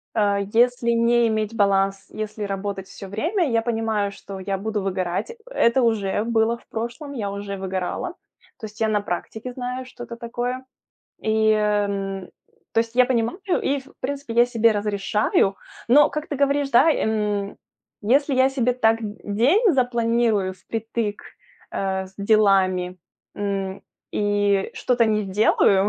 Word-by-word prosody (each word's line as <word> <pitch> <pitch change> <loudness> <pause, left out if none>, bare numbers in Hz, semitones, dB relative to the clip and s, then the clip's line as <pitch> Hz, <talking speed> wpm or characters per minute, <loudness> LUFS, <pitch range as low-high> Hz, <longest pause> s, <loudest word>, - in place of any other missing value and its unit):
Э, 205 -2 +2
если 240 0 +3
не 235 0 +3
иметь 220 0 -1
баланс, 195 -2 +1
если 215 0 -5
работать 195 -1 -4
всё 195 - -10
время, 325 - 0
я 230 -1 +2
понимаю, 225 -3 -1
что 195 -1 -9
я 195 +1 -2
буду 210 +1 -2
выгорать. 185 +2 -2
Э - - -11 0.2
это 260 - +3
уже 210 -4 +1
было 230 0 +1
в - - -24
прошлом, 240 +6 -5
я 210 -6 -3
уже 200 0 -5
выгорала. 190 - -3 0.5
То 225 - -6
есть 215 +2 -14
я 220 - +3
на 210 -1 +1
практике 220 +6 -5
знаю, 250 +1 -4
что 250 -1 -10
это 235 - -8
такое. 245 +2 -4 0.6
И, 220 0 +2
эм, 200 -2 -1 0.4
то 225 - +3
есть 230 +1 -4
я 250 - +7
понимаю, 240 +4 0 0.2
и, 280 +1 +1
в 275 +1 -17
принципе, 280 -2 -4
я 240 +1 +6
себе 230 -2 +3
разрешаю. 205 -1 +1 0.3
Но, 290 +5 +6
как 305 +1 -4
ты 290 - -3
говоришь, 280 0 +1
да, 255 +6 +6
эм, 210 -6 -1 0.5
если 275 +6 +3
я 260 +1 +4
себе 250 -2 +1
так 225 -2 +2
д 210 -1 -6
день 285 - +3
запланирую 235 -6 +1
впритык, 225 +1 -4 0.5
э, 190 -1 -2
с 190 - -18
делами, 190 -3 +3 0.4
м, 195 -1 -3 0.3
и 205 -1 +1
что-то 245 -2 +2
не 215 -1 +1
сделаю 195 0 +3
220 Hz, 155 wpm, -23 LUFS, 200-240 Hz, 0.6 s, я